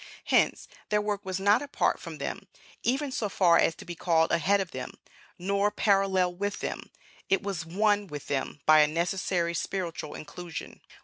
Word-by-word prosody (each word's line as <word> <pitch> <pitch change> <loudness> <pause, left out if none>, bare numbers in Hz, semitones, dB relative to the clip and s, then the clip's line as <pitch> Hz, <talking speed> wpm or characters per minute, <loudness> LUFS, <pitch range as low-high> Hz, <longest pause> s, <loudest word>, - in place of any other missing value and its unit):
Hence, - - +2 0.2
their 210 - +3
work 205 -1 -2
was 190 0 -3
not 205 +2 +4
apart 285 -1 0
from - - -8
them, - - -5 0.3
even 270 +3 0
so 215 -5 -2
far 175 -3 +4
as 165 - +3
to - - -12
be 175 - -5
called 160 -1 +2
ahead 185 +4 +3
of 190 -3 -3
them; 130 - -6 0.4
nor 200 +3 +1
parallel 195 -3 +2
with 205 +3 -3
them; - - -5 0.4
it 195 +2 +2
was 185 -5 -4
one 205 +3 +2
with 145 -4 -7
them 140 +1 -3
by 155 0 +7
a 150 - +6
necessary 170 +1 0
spiritual 170 -2 -3
inclusion. 165 +2 -8
185 Hz, 175 wpm, -28 LUFS, 170-205 Hz, 0.4 s, by